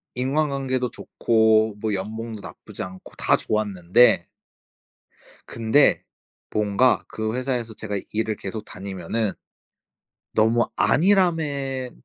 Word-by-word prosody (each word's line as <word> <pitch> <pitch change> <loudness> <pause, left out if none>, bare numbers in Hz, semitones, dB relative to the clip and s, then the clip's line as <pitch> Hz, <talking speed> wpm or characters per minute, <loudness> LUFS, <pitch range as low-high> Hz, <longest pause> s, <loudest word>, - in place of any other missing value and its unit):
인간관계도 135 -1 -1
좋고 110 -1 +2
뭐 110 0 -1
연봉도 110 +3 -5
나쁘지 - - -8
않고 95 0 -10
다 - - +3
좋았는데 105 +1 +2 1.2
근데 115 +5 +3 0.5
뭔가 105 +4 +2
그 110 0 -3
회사에서 125 -3 -2
제가 105 -1 -4 0.2
일을 110 0 -1
계속 105 +2 -6
다니면은 95 +3 -3 1.0
'너무 115 +2 +3
안일함에 150 -8 +2
110 Hz, 230 characters per minute, -23 LUFS, 105-130 Hz, 1.2 s, 다